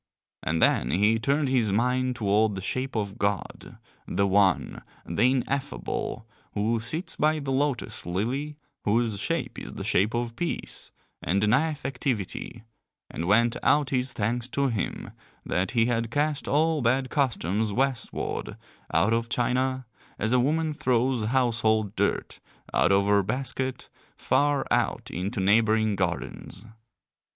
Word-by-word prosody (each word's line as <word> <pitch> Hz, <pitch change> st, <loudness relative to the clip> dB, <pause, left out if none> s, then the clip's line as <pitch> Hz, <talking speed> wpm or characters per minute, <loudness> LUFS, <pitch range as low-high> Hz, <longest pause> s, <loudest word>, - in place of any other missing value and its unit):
And 80 Hz, +1 st, -1 dB
then -, -, +3 dB
he 105 Hz, +8 st, +3 dB
turned 140 Hz, +4 st, +1 dB
his 120 Hz, -6 st, +2 dB
mind 125 Hz, +4 st, +1 dB
toward 105 Hz, -1 st, +2 dB
the -, -, -4 dB
shape 130 Hz, +7 st, -3 dB
of 100 Hz, -3 st, -3 dB
God, 100 Hz, -1 st, -3 dB, 0.3 s
the 100 Hz, -, +1 dB
One, 100 Hz, 0 st, +2 dB, 0.2 s
the 120 Hz, +4 st, +2 dB
Ineffable, 130 Hz, -3 st, -2 dB, 0.3 s
who 110 Hz, +3 st, +1 dB
sits 140 Hz, -, -3 dB
by 155 Hz, +1 st, +2 dB
the 140 Hz, -3 st, -3 dB
lotus 135 Hz, -, -1 dB
lily, 130 Hz, +12 st, -2 dB, 0.3 s
whose 110 Hz, -1 st, +1 dB
shape -, -, -2 dB
is -, -, -8 dB
the -, -, -5 dB
shape 105 Hz, +6 st, +1 dB
of 120 Hz, -1 st, -2 dB
peace, 170 Hz, +7 st, -4 dB, 0.3 s
and 95 Hz, +5 st, +1 dB
denieth 145 Hz, +8 st, +1 dB
activity, 125 Hz, -7 st, -3 dB, 0.5 s
and 85 Hz, -, -4 dB
went 115 Hz, +4 st, +3 dB
out 145 Hz, -2 st, +3 dB
his 130 Hz, 0 st, +1 dB
thanks 115 Hz, +3 st, -1 dB
to 140 Hz, +1 st, 0 dB
him 110 Hz, -5 st, -3 dB, 0.3 s
that 90 Hz, +2 st, 0 dB
he 115 Hz, -, +5 dB
had 115 Hz, -1 st, 0 dB
cast 150 Hz, +3 st, -1 dB
all 155 Hz, +1 st, +2 dB
bad 130 Hz, +2 st, +1 dB
customs 110 Hz, -, 0 dB
westward 130 Hz, +3 st, -2 dB, 0.3 s
out 95 Hz, +8 st, +3 dB
of 115 Hz, 0 st, 0 dB
China 130 Hz, +2 st, 0 dB, 0.3 s
as 110 Hz, +2 st, -1 dB
a 125 Hz, -, +5 dB
woman 155 Hz, +4 st, +1 dB
throws 125 Hz, -3 st, +1 dB
household 110 Hz, -4 st, +1 dB
dirt 100 Hz, -, -1 dB, 0.3 s
out 90 Hz, -, +3 dB
of 100 Hz, 0 st, +4 dB
her 100 Hz, 0 st, +4 dB
basket 130 Hz, +4 st, -3 dB, 0.3 s
far 145 Hz, -1 st, +2 dB
out -, -, 0 dB
into 95 Hz, +3 st, -3 dB
neighbouring 110 Hz, +2 st, +3 dB
gardens. 90 Hz, -, -4 dB
115 Hz, 140 wpm, -26 LUFS, 105-130 Hz, 0.5 s, he